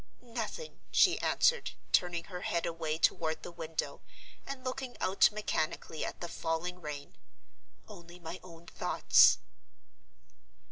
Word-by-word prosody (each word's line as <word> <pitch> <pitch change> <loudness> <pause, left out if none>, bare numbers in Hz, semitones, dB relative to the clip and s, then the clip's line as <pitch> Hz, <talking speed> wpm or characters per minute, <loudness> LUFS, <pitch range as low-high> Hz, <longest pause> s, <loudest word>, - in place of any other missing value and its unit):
"Nothing," 245 - -5
she - - +5
answered, 480 0 +2 0.2
turning 175 -2 +2
her 180 0 -7
head 170 - 0
away 165 -2 -2
toward 160 -1 +1
the - - -7
window, 165 -2 -4 0.5
and 275 -2 -6
looking 255 -1 -4
out 190 +2 +4
mechanically 160 -6 -2
at - - -5
the 175 - -3
falling 170 +2 -3
rain. 145 -2 -7 0.7
"Only 175 -4 -12
my 170 +1 -7
own 170 -2 -13
thoughts." - - +5
170 Hz, 125 wpm, -32 LUFS, 165-200 Hz, 0.7 s, she